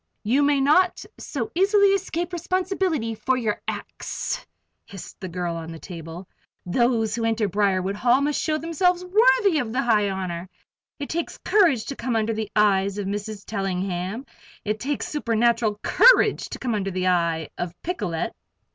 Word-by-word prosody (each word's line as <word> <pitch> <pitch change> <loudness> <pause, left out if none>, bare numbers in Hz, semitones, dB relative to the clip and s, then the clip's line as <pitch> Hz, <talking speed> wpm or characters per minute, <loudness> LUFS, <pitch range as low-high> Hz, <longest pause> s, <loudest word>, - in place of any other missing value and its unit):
"You 245 +7 +2
may 285 -1 +3
not 345 +9 +3
so 255 -6 -4
easily 400 +3 +4
escape 360 -3 -1
responsibility 360 - -1
for 240 +4 0
your 220 -4 -2
acts," - - -4 0.4
hissed 195 -2 -10
the 185 - -6
girl 175 -1 -3
on 165 0 -6
the 165 - -8
table. 165 +1 -9 0.4
"Those 225 +2 +1
who 230 0 -2
enter 225 -1 +1
Briarwood 195 -1 0
Hall 245 +3 +3
must 290 +1 0
show 310 -1 0
themselves 350 +3 0
worthy 420 -2 +4
of 235 -5 -3
the 260 +3 0
high 210 -4 +3
honor. 185 -2 -4 0.5
It 285 - -6
takes 340 +1 -3
courage 335 - +3
to 275 - -5
come 250 -3 -2
under 225 0 +1
the 215 -1 -3
eye 205 -2 +4
of 200 - -3
Mrs. 205 +1 -5
Tellingham; 195 +2 -3 0.4
it 215 +1 -1
takes 285 +4 -2
supernatural 230 -5 +1
courage - - +5
to - - -6
come 245 -3 -2
under 200 -2 -1
the 185 0 -1
eye 170 -3 +1
of 175 0 -5
Picolet!" 180 - -3
225 Hz, 165 wpm, -24 LUFS, 195-310 Hz, 0.5 s, courage